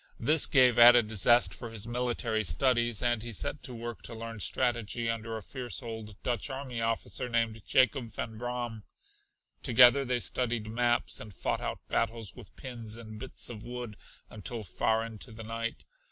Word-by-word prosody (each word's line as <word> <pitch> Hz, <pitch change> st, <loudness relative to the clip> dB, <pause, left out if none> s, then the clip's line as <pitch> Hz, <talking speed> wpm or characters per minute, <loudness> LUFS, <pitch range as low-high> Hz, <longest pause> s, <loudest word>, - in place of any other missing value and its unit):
This 155 Hz, +6 st, +5 dB
gave 125 Hz, -3 st, +5 dB
added 120 Hz, -2 st, +8 dB
zest 120 Hz, +4 st, +5 dB
for 120 Hz, -, -7 dB
his 110 Hz, -2 st, -3 dB
military 120 Hz, -2 st, -1 dB
studies 120 Hz, -, +1 dB
and 120 Hz, -2 st, +2 dB
he 120 Hz, +1 st, -5 dB
set 125 Hz, +7 st, -3 dB
to 125 Hz, -, -7 dB
work 120 Hz, 0 st, -6 dB
to 115 Hz, -, -6 dB
learn 115 Hz, 0 st, -7 dB
strategy 120 Hz, 0 st, 0 dB
under 115 Hz, 0 st, -3 dB
a 110 Hz, -, -8 dB
fierce 125 Hz, +2 st, -5 dB
old 110 Hz, -3 st, -7 dB
Dutch 120 Hz, +2 st, -1 dB
army 130 Hz, -3 st, -5 dB
officer 115 Hz, +2 st, -1 dB
named 115 Hz, -1 st, 0 dB
Jacob 130 Hz, -2 st, +2 dB
Van 110 Hz, -, -5 dB
Braam. 120 Hz, -3 st, -4 dB, 0.8 s
Together 125 Hz, +3 st, +7 dB
they 125 Hz, -2 st, 0 dB
studied 120 Hz, -2 st, -1 dB
maps 120 Hz, +2 st, 0 dB
and 110 Hz, -, -9 dB
fought -, -, -2 dB
out -, -, -5 dB
battles 115 Hz, -3 st, -1 dB
with 100 Hz, -, -13 dB
pins 115 Hz, -4 st, -7 dB
and 110 Hz, -2 st, -9 dB
bits 130 Hz, +2 st, -4 dB
of 110 Hz, -3 st, -7 dB
wood 120 Hz, -3 st, -6 dB, 0.3 s
until 110 Hz, +2 st, -6 dB
far 110 Hz, +3 st, 0 dB
into 115 Hz, 0 st, -8 dB
the 110 Hz, +1 st, -9 dB
night. 115 Hz, +1 st, -4 dB
115 Hz, 170 wpm, -30 LUFS, 110-120 Hz, 0.8 s, added